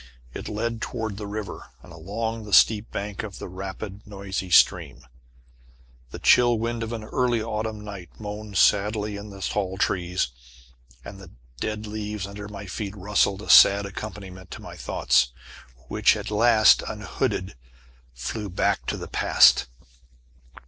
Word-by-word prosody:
It - - -6
led 115 +2 -3
toward 110 -3 -4
the 105 -1 -6
river, 105 0 -6
and - - -13
along 110 +7 -4
the 105 - -7
steep 110 -1 +5
bank 100 0 -4
of 105 -3 -8
the - - -7
rapid 95 +2 -7
noisy 95 -2 -5
stream. 70 -5 +3 1.0
The - - -8
chill 120 -1 +5
wind 115 +1 -2
of 115 0 -4
an 115 -2 -5
early 120 +1 0
autumn 110 -1 -4
night 95 -5 -8
moaned 105 -1 -6
sadly 105 +2 +2
in 100 +1 -8
the 100 -1 -11
tall 95 -2 -2
trees, 90 -5 0 0.8
and 100 - -9
the 95 -3 -12 0.3
dead 110 0 -3
leaves 105 -1 -4
under 100 +1 -8
my 100 -1 -8
feet 100 +1 -5
rustled 100 0 0
a - - -10
sad 100 0 +8
accompaniment 95 -2 -8
to - - -8
my - - -9
thoughts, - - +1 0.5
which - - +3
at - - -6
last, 110 0 +5
unhooded, 95 +1 -3 0.6
flew 100 - -5
back 95 - 0
to - - -1
the - - -7
past. - - +5
105 Hz, 150 wpm, -25 LUFS, 95-110 Hz, 1.0 s, sad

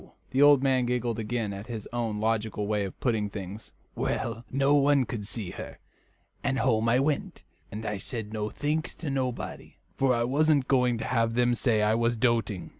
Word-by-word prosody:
The 130 - +2
old 145 -2 +7
man 130 -2 +2
giggled 120 -2 -1
again 110 -1 -2
at 100 +3 -8
his 115 -4 -6
own 115 -3 -2
logical 110 -1 -1
way 105 -1 0
of 95 - -8
putting 110 -5 0
things. 100 +1 -8 0.2
"Well, 115 0 -2
no 135 +2 +2
more 140 -2 +4
could 115 - -4
I - - -6
see 105 -3 -3
her; - - -8 0.7
and 135 -1 0
home 115 -2 +2
I 120 - +4
went, 140 +2 -1 0.3
and 110 +2 -6
I 105 -1 -2
said 110 0 -5
nothink 145 +10 -2
to 155 -4 -4
nobody, 130 -3 -4 0.2
for 130 -2 +2
I 120 - +1
wasn't 145 +2 +2
going 125 -3 +3
to - - -4
have 115 -2 +1
them 120 0 +3
say 115 -3 +2
I 105 +1 +3
was 115 +1 +1
doting." 115 -5 0
120 Hz, 190 wpm, -28 LUFS, 110-130 Hz, 0.7 s, old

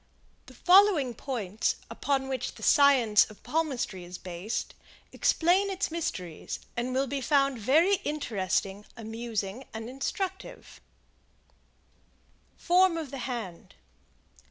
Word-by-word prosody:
] - - -37
The - - -14
following 360 -9 +5
points, 220 -5 -2
upon 270 -2 -1
which 260 -2 -3
the - - -12
Science 255 -9 +5
of 215 - -16
Palmistry 270 - -2
is 175 +1 -8
based, 185 +5 -5 0.4
explain 365 +4 +2
its 385 -3 -2
mysteries, 215 - -4 0.2
and 240 +1 -2
will 265 +2 +1
be 275 0 -3
found 275 -1 +2
very 320 - +4
interesting, 205 - -2
amusing 225 0 -4
and 225 0 -5
instructive: 380 - -5 1.8
Form 360 -1 +3
of 310 -5 -5
the 275 - -6
Hand. 205 - -6
260 Hz, 115 wpm, -28 LUFS, 215-320 Hz, 1.8 s, following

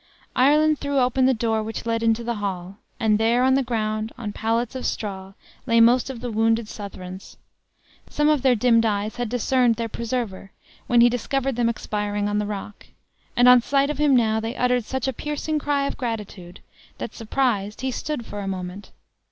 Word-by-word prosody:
Ireland 300 +3 +4
threw 285 -1 -2
open 255 0 +3
the 265 - +4
door 225 -1 0
which 225 +2 -5
led 230 0 0
into 230 0 +1
the 235 0 -2
hall, 190 -1 -4 0.2
and 215 -1 +2
there, 235 +3 +3
on 260 0 +4
the 270 - +3
ground, 220 -2 -2
on 215 -4 -5
pallets 230 +3 -1
of 260 - -3
straw, 195 -2 -5 0.3
lay 230 -1 +4
most 240 +3 +5
of 250 -4 -7
the 245 -1 -4
wounded 225 +1 +1
Southrons. 190 -3 -9 0.7
Some 295 0 +1
of 305 -3 +3
their 260 -2 +4
dimmed 230 0 +3
eyes 210 0 -1
had 245 -2 -2
discerned 245 0 +2
their 230 +1 -3
preserver, 225 -4 -4 0.4
when 240 -1 +5
he 240 - +7
discovered 270 +2 -1
them 235 -1 +1
expiring 205 -2 -2
on 205 0 0
the 210 - -2
rock; 205 0 -7 0.5
and 245 +1 +5
on 250 -1 +8
sight 275 +3 +1
of 295 - -6
him 295 -3 +4
now, 220 -2 +2
they 225 +3 -4
uttered 250 -2 +1
such 265 +1 -3
a 265 - -1
piercing 300 +3 -3
cry 285 -1 0
of - - -4
gratitude, 210 -7 -6 0.4
that, - - -6
surprised, 220 -3 -1
he 260 0 -1
stood 275 -1 -4
for 205 - -7
a 200 - -4
moment. 185 +1 -6
230 Hz, 195 wpm, -23 LUFS, 210-255 Hz, 0.7 s, on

